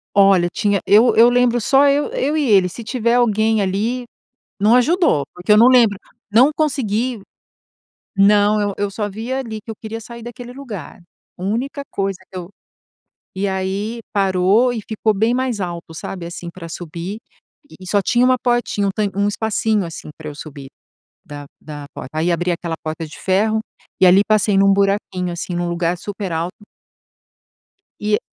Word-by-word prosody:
Olha, 195 Hz, -3 st, +5 dB
tinha 205 Hz, -3 st, +1 dB
Eu 220 Hz, +4 st, +5 dB
eu 230 Hz, +2 st, +7 dB
lembro 245 Hz, -1 st, +2 dB
só 275 Hz, +5 st, +4 dB
eu 285 Hz, +1 st, +2 dB
eu 315 Hz, -, -1 dB
e 305 Hz, -, +1 dB
ele, 190 Hz, -3 st, +5 dB
se 205 Hz, +7 st, -9 dB
tiver 235 Hz, 0 st, 0 dB
alguém 220 Hz, -2 st, +2 dB
ali, 220 Hz, +6 st, -1 dB, 0.5 s
não 215 Hz, +3 st, +4 dB
ajudou, 250 Hz, -, +3 dB
porque 180 Hz, +3 st, -2 dB
eu 210 Hz, -, +7 dB
não 230 Hz, +3 st, +7 dB
lembro. 235 Hz, -6 st, +5 dB, 0.3 s
Não 245 Hz, +7 st, +6 dB
consegui. 255 Hz, -5 st, -1 dB, 1.0 s
Não, 205 Hz, +1 st, +4 dB
eu 205 Hz, -1 st, -1 dB
eu 205 Hz, 0 st, -2 dB
só 205 Hz, 0 st, -3 dB
via 230 Hz, +6 st, -4 dB
ali 225 Hz, -4 st, -5 dB
que -, -, -16 dB
eu 220 Hz, -, -5 dB
queria 220 Hz, +1 st, -7 dB
sair 235 Hz, 0 st, -10 dB
daquele 245 Hz, 0 st, -9 dB
lugar. 225 Hz, -, -9 dB, 0.4 s
Única 240 Hz, +10 st, -3 dB
coisa 195 Hz, -1 st, -2 dB
que 185 Hz, -, -7 dB
eu 175 Hz, 0 st, -7 dB, 0.9 s
E 195 Hz, +1 st, -1 dB
aí 195 Hz, +4 st, -3 dB
parou 195 Hz, +4 st, +3 dB
e 230 Hz, -, -3 dB
ficou 220 Hz, 0 st, 0 dB
bem 225 Hz, +4 st, +1 dB
mais 255 Hz, -5 st, -1 dB
alto, 170 Hz, -2 st, -5 dB
sabe, 170 Hz, +1 st, -6 dB
assim 170 Hz, 0 st, -7 dB
para 170 Hz, -1 st, -10 dB
subir 170 Hz, +4 st, -6 dB, 0.5 s
e -, -, -14 dB
e 185 Hz, -, -10 dB
só 205 Hz, 0 st, +2 dB
tinha 240 Hz, +6 st, +2 dB
uma 255 Hz, 0 st, +4 dB
portinha, 240 Hz, -4 st, 0 dB
um -, -, +1 dB
tan 210 Hz, -2 st, 0 dB
um 200 Hz, 0 st, +2 dB
espacinho, 215 Hz, -1 st, 0 dB
assim, 165 Hz, -2 st, -9 dB
pra 155 Hz, -1 st, -7 dB
eu 150 Hz, -, -7 dB
subir 140 Hz, -2 st, -10 dB, 0.6 s
da 145 Hz, -1 st, -9 dB
da 145 Hz, -2 st, -9 dB
porta. 130 Hz, -, -8 dB
Aí 170 Hz, +2 st, +1 dB
abri 175 Hz, +1 st, 0 dB
aquela 170 Hz, -1 st, -3 dB
porta 160 Hz, +1 st, -4 dB
de 150 Hz, -, -12 dB
ferro 215 Hz, +3 st, +1 dB, 0.4 s
e -, -, +6 dB
ali 185 Hz, +2 st, +7 dB
passei 215 Hz, -2 st, +2 dB
num 195 Hz, 0 st, +5 dB
buraquinho, 195 Hz, -2 st, 0 dB
assim, 175 Hz, +1 st, -5 dB
num 175 Hz, 0 st, -1 dB
lugar 170 Hz, 0 st, -1 dB
super 200 Hz, 0 st, -6 dB
alto. 170 Hz, +5 st, -4 dB, 1.4 s
E 210 Hz, 0 st, -1 dB
e -, -, +2 dB
205 Hz, 180 wpm, -19 LUFS, 180-235 Hz, 1.4 s, eu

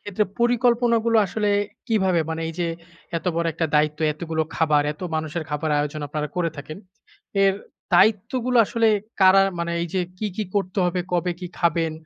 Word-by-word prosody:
ক্ষেত্রে 205 Hz, +1 st, -1 dB, 0.2 s
পরিকল্পনাগুলো 235 Hz, -1 st, +3 dB
আসলে 210 Hz, +2 st, -1 dB, 0.4 s
কিভাবে? 190 Hz, -7 st, +2 dB
মানে 160 Hz, 0 st, -3 dB
এইযে 170 Hz, +1 st, -3 dB, 0.5 s
এত -, -, -14 dB
বড় 170 Hz, -, 0 dB
একটা 165 Hz, +1 st, -1 dB
দায়িত্ব, 150 Hz, 0 st, +2 dB
এতগুলো 160 Hz, 0 st, -2 dB
খাবার, 150 Hz, -2 st, +3 dB
এত 150 Hz, -, -22 dB, 0.2 s
মানুষের 155 Hz, +1 st, -3 dB
খাবার 150 Hz, +1 st, -2 dB
আয়োজন 150 Hz, +1 st, -2 dB
আপনারা 150 Hz, +1 st, -3 dB
করে 170 Hz, -2 st, 0 dB
থাকেন। 155 Hz, +3 st, -8 dB, 0.7 s
এর 195 Hz, -1 st, +4 dB, 0.4 s
দায়িত্বগুলো 240 Hz, +4 st, +3 dB
আসলে 230 Hz, +1 st, +2 dB, 0.3 s
কারা 190 Hz, 0 st, +7 dB, 0.2 s
মানে 170 Hz, 0 st, -2 dB
এইযে 175 Hz, +2 st, -2 dB, 0.2 s
কি, 215 Hz, -, -2 dB
কি 215 Hz, -, -1 dB
করতে 195 Hz, -1 st, -1 dB
হবে, 180 Hz, +1 st, -1 dB
কবে 180 Hz, 0 st, +1 dB
কি 180 Hz, -, -5 dB
খাবেন, 165 Hz, -1 st, +1 dB
175 Hz, 160 wpm, -23 LUFS, 160-210 Hz, 0.7 s, কারা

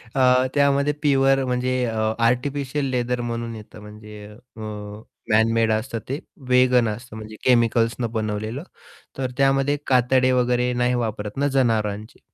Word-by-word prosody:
अ, 130 Hz, -1 st, +4 dB
त्यामध्ये 140 Hz, 0 st, +2 dB
प्युअर 135 Hz, -2 st, +3 dB
म्हणजे 125 Hz, 0 st, -1 dB, 0.5 s
artificial 135 Hz, +4 st, 0 dB
leather 125 Hz, -1 st, -1 dB
म्हणून 115 Hz, -1 st, -4 dB
येतं 105 Hz, 0 st, -12 dB
म्हणजे 105 Hz, 0 st, -11 dB
अ, 115 Hz, +2 st, -15 dB, 0.7 s
मॅनमेड 110 Hz, +1 st, +3 dB
असतं 115 Hz, +2 st, -2 dB
ते 140 Hz, +4 st, -2 dB, 0.3 s
वेगन 125 Hz, -2 st, +4 dB
असतं 110 Hz, +3 st, -6 dB
म्हणजे 110 Hz, 0 st, -9 dB
केमिकल्सनं 115 Hz, -1 st, +2 dB
बनवलेलं 110 Hz, +4 st, -3 dB, 0.5 s
तर 130 Hz, -2 st, -2 dB
त्यामध्ये 135 Hz, +1 st, +2 dB
कातडे 130 Hz, 0 st, +3 dB
वगैरे 125 Hz, 0 st, +1 dB
नाही 125 Hz, 0 st, +1 dB
वापरत 110 Hz, -3 st, -4 dB
ना 140 Hz, +1 st, +1 dB
जनावरांचे. 110 Hz, -6 st, -1 dB
125 Hz, 125 wpm, -22 LUFS, 110-130 Hz, 0.7 s, अ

